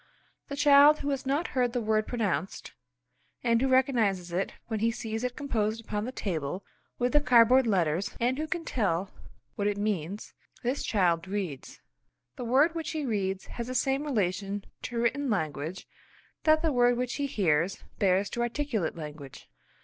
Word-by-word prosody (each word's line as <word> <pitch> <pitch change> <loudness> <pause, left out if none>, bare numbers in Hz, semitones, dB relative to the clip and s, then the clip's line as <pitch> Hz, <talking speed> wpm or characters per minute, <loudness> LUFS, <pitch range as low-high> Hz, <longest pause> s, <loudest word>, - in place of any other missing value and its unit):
The 280 - -5
child 290 +1 +6
who 285 - -2
has 270 -1 -3
not 290 +5 0
heard 245 -2 0
the 245 - 0
word 215 -1 +1
pronounced, 205 -5 -2 0.7
and 230 -1 +3
who 270 - +2
recognises 230 -9 +2
it 180 +3 -1
when 220 -2 -3
he 225 +2 +2
sees 225 -1 -4
it 250 -1 -2
composed 225 -6 -1
upon 210 -2 -3
the 255 - -4
table 180 - -3 0.3
with 245 0 0
the 295 - +5
cardboard 250 0 +5
letters 180 -3 0
and 250 +3 +1
who 310 - -2
can 340 -1 -3
tell 190 -5 -1 0.4
what 205 - -1
it 205 -1 0
means; 205 -2 -3 0.3
this 250 +4 -1
child 180 -4 +1
reads. 185 -9 -5 0.5
The - - -6
word 275 +8 +4
which 330 -1 -4
he 310 -2 -2
reads 195 -5 -2
has 235 0 -6
the 255 - -4
same 270 +2 +1
relation 200 - -1 0.2
to 240 - -4
written 260 +4 0
language 160 -3 -3 0.6
that 310 +1 +4
the 320 -3 +2
word 245 -1 +4
which 250 0 -2
he 285 -1 -1
hears 180 - 0 0.2
bears 195 0 +3
to 240 - -2
articulate 240 - -1
language. 150 -4 -9
230 Hz, 170 wpm, -28 LUFS, 190-260 Hz, 0.7 s, child